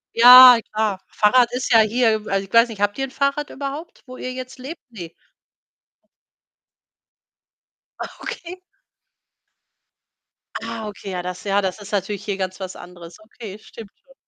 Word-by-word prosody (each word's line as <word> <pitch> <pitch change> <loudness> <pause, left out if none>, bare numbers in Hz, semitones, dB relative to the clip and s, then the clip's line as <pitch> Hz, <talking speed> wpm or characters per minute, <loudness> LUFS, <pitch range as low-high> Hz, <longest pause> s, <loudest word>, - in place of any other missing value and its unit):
Ja, 250 0 +9
klar. 215 -3 -1
Fahrrad 240 +3 +2
ist 255 +1 -3
ja 225 - +6
hier 220 0 +1
also, 195 0 -1
ich - - -27
weiß 230 +1 +5
nicht, 205 -2 -9
habt 205 +3 0
ihr 270 - -3
'n 265 - -13
Fahrrad 280 +1 -2
überhaupt, 285 +4 -8
wo 255 - -11
ihr 255 - -6
jetzt 255 0 -9
lebt? 275 +7 -9
Ne. 175 -7 -10 2.9
Ah, - - -6
okay. 360 +2 -8 2.0
Ah, 225 -1 -6
okay, 205 -1 -9
ja, 180 -1 -4
das 180 0 -7
ja, 200 0 0
das 190 +2 -4
ist 205 0 -12
natürlich 200 0 -3
hier 200 -2 -3
ganz 185 0 -5
was 190 -1 -7
anderes. 175 -1 -13
Okay, 215 -2 -12
stimmt 215 -2 -13
schon. - - -23
220 Hz, 155 wpm, -20 LUFS, 195-255 Hz, 2.9 s, Ja